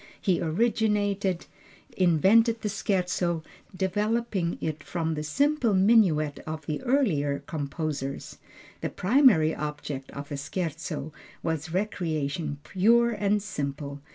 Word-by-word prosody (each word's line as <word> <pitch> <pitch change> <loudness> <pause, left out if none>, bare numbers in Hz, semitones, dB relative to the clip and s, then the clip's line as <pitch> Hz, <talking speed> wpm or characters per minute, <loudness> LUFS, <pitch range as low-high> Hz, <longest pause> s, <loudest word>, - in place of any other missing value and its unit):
He 185 -3 +1
originated, 205 0 +1 0.5
invented 200 +7 +4
the 210 - -1
Scherzo, 180 -5 0 0.3
developing 205 -1 0
it 155 -2 -4
from 165 -2 -2
the 150 - -3
simple 255 - +1
minuet 185 -8 +4
of 155 -1 -5
the 150 - -3
earlier 190 - +1
composers. 145 -2 -4 0.4
The - - -1
primary 195 - +4
object 150 -2 -5
of 140 0 -8
the 145 - -4
Scherzo 155 -1 -4 0.3
was 160 0 -2
recreation 160 -6 -2
pure 235 +7 +3
and 205 -1 0
simple. 140 -6 -4
175 Hz, 110 wpm, -27 LUFS, 150-210 Hz, 0.5 s, invented